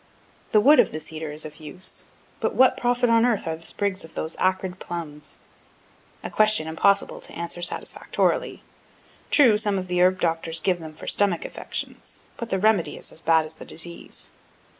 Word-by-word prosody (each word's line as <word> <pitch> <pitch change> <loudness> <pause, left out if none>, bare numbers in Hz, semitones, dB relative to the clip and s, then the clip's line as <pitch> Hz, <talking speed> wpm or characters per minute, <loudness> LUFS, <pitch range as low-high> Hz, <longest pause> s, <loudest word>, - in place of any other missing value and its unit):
The 215 - +6
wood 290 +8 +6
of - - +5
the 155 - -4
cedar 155 0 -6
is 150 +1 -4
of 150 -1 -9
use 155 +4 -5 0.3
but - - -1
what 260 0 +6
profit 245 0 +1
on 230 -1 +4
earth 240 -4 +1
are 160 -1 -2
those 165 +1 -11
sprigs 200 -2 -2
of 160 - -12 0.2
acrid 185 0 0
plums? 155 -4 -7 0.8
A - - -5
question 215 -7 +4
impossible 195 +5 +2
to - - -9
answer 170 +1 -4
satisfactorily. 175 - -1 0.7
True, 235 -8 +5
some 205 -2 0
of 185 -1 -3
the 180 0 +1
herb 185 +1 +4
doctors 165 -1 -1
give 180 +2 +1
them 160 -1 -9
for - - -10
stomachic 195 -5 +2
affections, - - -6
but 235 - -6
the 190 - +1
remedy 205 -3 +2
is - - -7
as 160 - -10
bad 160 -1 +4
as 155 - -10
the - - -11
disease. 170 +1 -7
180 Hz, 185 wpm, -24 LUFS, 160-210 Hz, 0.8 s, The